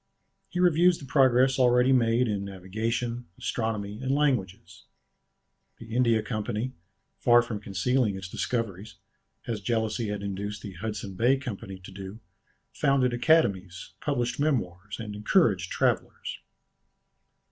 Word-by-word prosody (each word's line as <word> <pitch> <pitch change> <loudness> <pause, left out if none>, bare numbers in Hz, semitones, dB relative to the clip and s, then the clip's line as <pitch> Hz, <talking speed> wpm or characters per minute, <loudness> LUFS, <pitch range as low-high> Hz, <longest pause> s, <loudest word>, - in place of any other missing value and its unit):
He 180 - -4
reviews 175 0 +4
the 140 - -10
progress 130 -1 +4
already 125 +1 +5
made 120 0 +3
in 100 -2 -1
navigation, 110 +6 -3
astronomy, 105 -2 -3
and 130 - -3
languages. 100 - -1 0.9
The 115 0 -8
India 115 -3 +3
Company, 115 +2 -3 0.5
far 120 -1 +5
from 115 -3 -5
concealing 105 +3 0
its 95 -1 -6
discoveries, 110 0 -3 0.5
as 110 -3 -3
jealousy 110 +1 -1
had 105 -1 -4
induced 100 +1 -4
the 100 - -7
Hudson 100 +1 -5
Bay 120 +8 +3
Company 100 -7 -6
to 95 +1 -12
do, 95 +2 -8 0.5
founded 135 -3 +2
academies, 100 - +1
published 125 -4 -1
memoirs, 105 - -1
and 110 -2 -5
encouraged 105 - +2
travellers. - - -1
110 Hz, 125 wpm, -27 LUFS, 100-125 Hz, 0.9 s, already